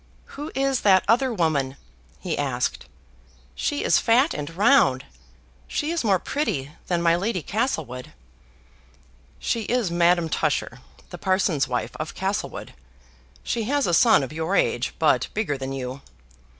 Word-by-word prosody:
"Who 295 Hz, +3 st, -6 dB
is 270 Hz, -1 st, +1 dB
that 190 Hz, -2 st, +4 dB
other 245 Hz, +4 st, +3 dB
woman?" 150 Hz, -, 0 dB, 0.4 s
he 175 Hz, -4 st, -3 dB
asked. 130 Hz, -3 st, -2 dB, 0.7 s
"She 290 Hz, -, -2 dB
is -, -, +4 dB
fat 245 Hz, +6 st, +3 dB
and 145 Hz, -1 st, -5 dB
round; 195 Hz, -, +4 dB, 0.6 s
she 300 Hz, +2 st, -2 dB
is 340 Hz, -4 st, -1 dB
more 200 Hz, -4 st, +3 dB
pretty 150 Hz, -, -2 dB, 0.2 s
than 175 Hz, -1 st, 0 dB
my 170 Hz, 0 st, +4 dB
Lady 185 Hz, -1 st, -2 dB
Castlewood." 160 Hz, -, -3 dB, 1.3 s
"She 230 Hz, -, -1 dB
is 240 Hz, -7 st, 0 dB
Madame 170 Hz, 0 st, +3 dB
Tusher, 160 Hz, -, -1 dB, 0.3 s
the -, -, -8 dB
parson's 185 Hz, -7 st, +1 dB
wife 125 Hz, -1 st, -3 dB
of 155 Hz, 0 st, -5 dB
Castlewood. 195 Hz, +2 st, -3 dB, 0.7 s
She 230 Hz, -2 st, -2 dB
has 285 Hz, +3 st, +1 dB
a 175 Hz, -, 0 dB
son 220 Hz, -, +5 dB
of 135 Hz, -, -6 dB
your 160 Hz, +5 st, -1 dB
age, -, -, 0 dB
but -, -, +2 dB
bigger 195 Hz, -10 st, -1 dB
than 135 Hz, 0 st, -5 dB
you." 130 Hz, 0 st, -5 dB
180 Hz, 145 wpm, -24 LUFS, 145-235 Hz, 1.3 s, son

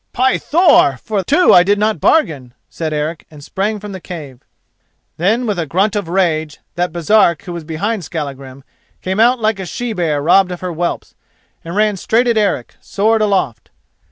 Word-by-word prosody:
"By 260 Hz, +1 st, +1 dB
Thor! 310 Hz, -, +4 dB
for 205 Hz, +6 st, -3 dB
two 325 Hz, -, +4 dB
I 175 Hz, -, +8 dB
did 200 Hz, +3 st, +2 dB
not 215 Hz, +1 st, 0 dB
bargain," 140 Hz, -, +1 dB, 0.2 s
said 160 Hz, -2 st, -4 dB
Eric, 155 Hz, +2 st, -4 dB
and 150 Hz, -2 st, -14 dB
sprang 205 Hz, +7 st, -2 dB
from 205 Hz, 0 st, -8 dB
the 190 Hz, -, -7 dB
cave. 150 Hz, -9 st, -9 dB, 0.8 s
Then, 220 Hz, +9 st, +1 dB
with 205 Hz, -5 st, -2 dB
a 165 Hz, -, -2 dB
grunt 195 Hz, +8 st, 0 dB
of 205 Hz, -5 st, -2 dB
rage, 160 Hz, -4 st, 0 dB, 0.2 s
that 175 Hz, 0 st, -2 dB
Baresark 170 Hz, +1 st, +2 dB
who 175 Hz, -, -7 dB
was 170 Hz, -1 st, -6 dB
behind 185 Hz, +6 st, -3 dB
Skallagrim 140 Hz, -4 st, -7 dB, 0.4 s
came 190 Hz, +2 st, -2 dB
out 240 Hz, +3 st, +4 dB
like 215 Hz, -2 st, 0 dB
a 190 Hz, -, -5 dB
she 240 Hz, +5 st, -4 dB
bear 165 Hz, -6 st, -1 dB
robbed 180 Hz, +5 st, +3 dB
of 180 Hz, -, -7 dB
her 180 Hz, -1 st, -4 dB
whelps, 170 Hz, +2 st, -3 dB, 0.5 s
and 170 Hz, +2 st, -7 dB
ran 210 Hz, -1 st, +1 dB
straight 230 Hz, +6 st, +1 dB
at 235 Hz, -, +2 dB
Eric, 195 Hz, -, -1 dB
sword 220 Hz, +2 st, 0 dB
aloft. 185 Hz, -, -1 dB
185 Hz, 185 wpm, -16 LUFS, 155-215 Hz, 0.8 s, I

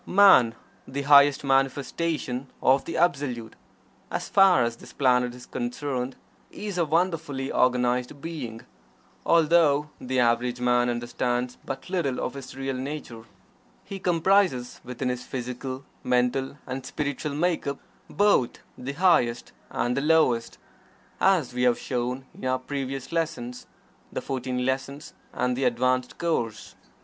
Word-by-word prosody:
Man, 180 Hz, -, +6 dB, 0.3 s
the 140 Hz, +2 st, -4 dB
highest 140 Hz, 0 st, +6 dB
manifestation 135 Hz, 0 st, 0 dB
of 135 Hz, +1 st, +3 dB
the 165 Hz, -, -4 dB
Absolute, 135 Hz, -9 st, 0 dB, 0.5 s
as -, -, -4 dB
far 195 Hz, -10 st, +6 dB
as 115 Hz, 0 st, -2 dB
this -, -, -14 dB
planet 125 Hz, -2 st, +2 dB
is 125 Hz, -, -12 dB
concerned, 125 Hz, +1 st, -3 dB, 0.3 s
is 205 Hz, -4 st, -5 dB
a 170 Hz, -, +3 dB
wonderfully 160 Hz, -5 st, -1 dB
organized 125 Hz, +1 st, +1 dB
being 135 Hz, -8 st, -6 dB, 0.7 s
although 155 Hz, -3 st, +4 dB
the 130 Hz, 0 st, -1 dB
average 120 Hz, +1 st, +2 dB
man 125 Hz, 0 st, +2 dB
understands 120 Hz, +1 st, -2 dB
but 135 Hz, -, -6 dB
little 170 Hz, -9 st, -1 dB
of -, -, -3 dB
his 135 Hz, -2 st, -9 dB
real 135 Hz, 0 st, -2 dB
nature. 130 Hz, -4 st, -6 dB, 0.6 s
He 195 Hz, -, -7 dB
comprises 175 Hz, -7 st, +2 dB
within 125 Hz, +1 st, -3 dB
his 125 Hz, 0 st, -3 dB
physical, 130 Hz, +2 st, -5 dB, 0.2 s
mental 125 Hz, +2 st, +1 dB
and 130 Hz, 0 st, -5 dB
spiritual 145 Hz, +1 st, -3 dB
make 170 Hz, +1 st, 0 dB
up 140 Hz, 0 st, -2 dB, 0.3 s
both 205 Hz, -12 st, +2 dB, 0.2 s
the 130 Hz, +3 st, -4 dB
highest 145 Hz, -8 st, +2 dB, 0.2 s
and 120 Hz, +1 st, -1 dB
the 140 Hz, -, 0 dB
lowest, 150 Hz, -7 st, +2 dB, 0.6 s
as 180 Hz, -10 st, +3 dB
we 125 Hz, -, -2 dB
have 125 Hz, -1 st, +4 dB
shown 125 Hz, +1 st, -3 dB
in -, -, -14 dB
our 130 Hz, 0 st, +2 dB
previous 135 Hz, 0 st, -5 dB
lessons 125 Hz, -7 st, -3 dB, 0.4 s
(the -, -, -3 dB
"Fourteen 125 Hz, -1 st, -2 dB
Lessons" 135 Hz, +3 st, -3 dB, 0.2 s
and 125 Hz, 0 st, 0 dB
the 135 Hz, +1 st, -1 dB
"Advanced 125 Hz, +1 st, +1 dB
Course"). 115 Hz, -, -2 dB
130 Hz, 135 wpm, -26 LUFS, 125-150 Hz, 0.7 s, Man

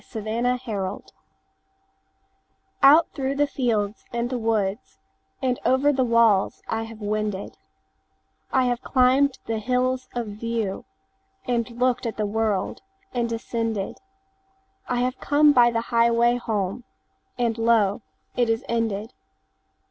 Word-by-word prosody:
Reluctance 220 Hz, -2 st, -2 dB, 1.7 s
OUT 300 Hz, +4 st, +7 dB
through 270 Hz, 0 st, -2 dB
the 290 Hz, +1 st, +3 dB
fields 225 Hz, -7 st, -1 dB
and 235 Hz, +1 st, -2 dB
the 250 Hz, -, -1 dB
woodsAnd 225 Hz, +4 st, -3 dB
over 275 Hz, +3 st, +3 dB
the 260 Hz, -1 st, +1 dB
walls 230 Hz, -5 st, +3 dB
I 225 Hz, 0 st, -2 dB
have 225 Hz, -1 st, -11 dB
wended;I 210 Hz, +4 st, -5 dB
have 245 Hz, 0 st, 0 dB
climbed 260 Hz, +1 st, +3 dB
the 225 Hz, -1 st, -2 dB
hills 255 Hz, +2 st, 0 dB
of 240 Hz, -1 st, -1 dB
viewAnd 215 Hz, -1 st, -3 dB, 1.0 s
looked 250 Hz, -1 st, +1 dB
at 225 Hz, -, -5 dB
the 215 Hz, -, 0 dB
world, 210 Hz, -2 st, -1 dB, 0.3 s
and 235 Hz, -1 st, -1 dB
descended;I 385 Hz, -, -5 dB
have 255 Hz, +1 st, -1 dB
come 295 Hz, 0 st, +4 dB
by 240 Hz, -3 st, +6 dB
the 230 Hz, -1 st, -1 dB
highway 235 Hz, +1 st, +4 dB
home, 215 Hz, -1 st, -2 dB, 0.5 s
And 235 Hz, -2 st, 0 dB
lo, 225 Hz, -3 st, +3 dB, 0.3 s
it 240 Hz, -2 st, +1 dB
is 225 Hz, +2 st, 0 dB
ended. 225 Hz, -1 st, -2 dB
235 Hz, 110 wpm, -24 LUFS, 220-255 Hz, 1.7 s, OUT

